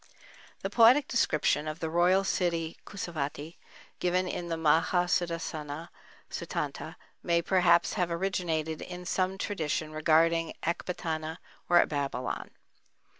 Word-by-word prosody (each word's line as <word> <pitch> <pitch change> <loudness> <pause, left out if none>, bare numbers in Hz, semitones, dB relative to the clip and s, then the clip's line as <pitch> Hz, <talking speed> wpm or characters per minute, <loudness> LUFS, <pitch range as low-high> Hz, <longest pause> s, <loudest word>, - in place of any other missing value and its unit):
The 195 - -1
poetic 245 +6 +6
description 155 - +1
of 155 +1 -4
the 160 - -2
royal 175 +4 +3
city 170 -4 -1
Kusavati, 160 -4 -5 0.4
given 180 +1 +1
in 175 -1 -4
the 165 -1 -2
Maha 165 +3 +3
Sudassana 165 -3 -2 0.4
Suttanta, - - -4 0.3
may 170 -1 +2
perhaps 175 -2 +3
have 180 -4 0
originated 170 -3 -1
in 180 0 -7
some 185 +2 0
tradition 155 -5 -2
regarding 165 +1 +2
Ecbatana 160 -2 -3 0.3
or 175 0 +6
Babylon. 140 -4 -3
170 Hz, 115 wpm, -29 LUFS, 155-180 Hz, 0.4 s, poetic